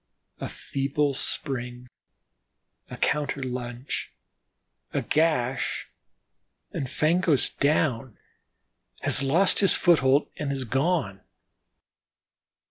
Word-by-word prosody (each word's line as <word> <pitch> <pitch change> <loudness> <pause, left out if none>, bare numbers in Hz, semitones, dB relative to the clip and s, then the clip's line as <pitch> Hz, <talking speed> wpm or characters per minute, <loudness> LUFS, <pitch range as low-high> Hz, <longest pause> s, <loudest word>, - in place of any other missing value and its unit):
A - - -4
feeble 140 +1 -1
spring, 125 -2 -1 1.0
a - - -8
counter 145 -2 -1
lunge, 125 0 -5 0.8
a - - -1
gash, 145 -5 0 0.8
and 135 - -4
"Fango's 160 -1 +2
down," 135 -5 0 0.8
has - - +3
lost 165 +8 +3
his 195 - +4
foothold 145 -5 +3
and 145 -2 -2
is 135 -1 -3
gone. 135 - -1
140 Hz, 85 wpm, -26 LUFS, 125-155 Hz, 1.0 s, his